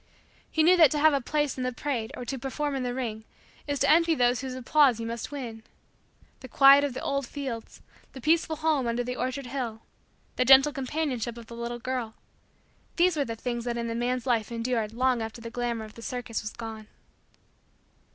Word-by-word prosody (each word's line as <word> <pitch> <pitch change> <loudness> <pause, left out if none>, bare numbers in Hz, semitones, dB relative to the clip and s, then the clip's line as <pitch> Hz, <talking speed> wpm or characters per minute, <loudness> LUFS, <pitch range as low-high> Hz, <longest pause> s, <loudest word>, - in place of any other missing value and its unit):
He 315 - +2
knew 360 +3 +6
that 320 -4 +8
to 300 - -1
have 310 +1 +5
a 280 - +1
place 295 +1 -1
in - - -1
the 255 - -1
parade 240 -3 -3
or 250 - -6
to 265 +2 -4
perform 285 +3 -3
in 265 - -2
the 245 -1 -2
ring, 225 -4 -4 0.4
is 285 0 -1
to - - +4
envy 330 +1 +4
those 245 -2 +2
whose 260 -1 -5
applause 260 -1 +3
you 230 - -4
must 230 +2 -5
win. 240 -6 -6 0.8
The 260 - -10
quiet 275 +3 +7
of 280 -3 -2
the - - -5
old 275 -2 -1
fields; 260 -6 -6 0.3
the 265 - -9
peaceful 320 +3 +2
home 305 -5 +1
under 235 +1 0
the 250 +1 -4
orchard 255 +2 -3
hill; 240 -4 -4 0.5
the 255 - +3
gentle 270 +3 +7
companionship 260 -4 -3
of 235 - -10
the 235 - -10
little 235 +1 -4
girl; 240 -2 -4 0.8
these 350 0 +3
were 285 -2 0
the 230 - -4
things 240 +1 -4
that 240 -1 -2
in 235 0 -2
the - - -2
man's 245 +1 -1
life 235 -3 0
endured 230 -2 -1
long 250 +1 +1
after 225 +1 -6
the 230 0 -8
glamor 240 -2 -2
of 215 - -13
the 230 - -12
circus 240 -1 -4
was 210 - -5
gone. 220 -2 -8
250 Hz, 210 wpm, -27 LUFS, 235-280 Hz, 0.8 s, that